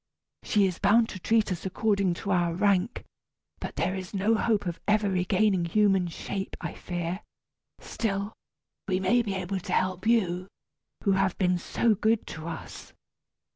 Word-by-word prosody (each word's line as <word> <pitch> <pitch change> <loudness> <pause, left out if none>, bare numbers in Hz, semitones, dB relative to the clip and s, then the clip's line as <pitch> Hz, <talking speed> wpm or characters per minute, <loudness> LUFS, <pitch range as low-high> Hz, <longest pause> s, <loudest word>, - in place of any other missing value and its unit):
She 205 -2 +2
is 185 -2 -2
bound 225 +3 +4
to 185 - -7
treat 220 +2 +2
us 175 - -3
according 195 -1 +1
to 200 - -4
our 175 -2 +2
rank, 200 +3 +1 0.5
but - - -6
there 185 - 0
is 190 +1 -6
no 200 +4 +2
hope 220 -2 +1
of 175 -1 -3
ever 210 0 +3
regaining 185 0 +2
human 195 0 +3
shape, 190 +3 -5
I - - -5
fear. 175 +1 -4 0.6
Still, 200 -1 -3 0.5
we 185 -2 +1
may 190 +6 +3
be 205 -4 -3
able 190 +1 -2
to 185 0 -5
help 185 +2 0
you, 185 -6 +2 0.6
who 200 - +3
have 190 -1 +1
been 180 -2 +2
so 225 +5 +1
good 220 +2 +1
to 155 0 -7
us." 165 - -8
195 Hz, 165 wpm, -27 LUFS, 180-210 Hz, 0.6 s, bound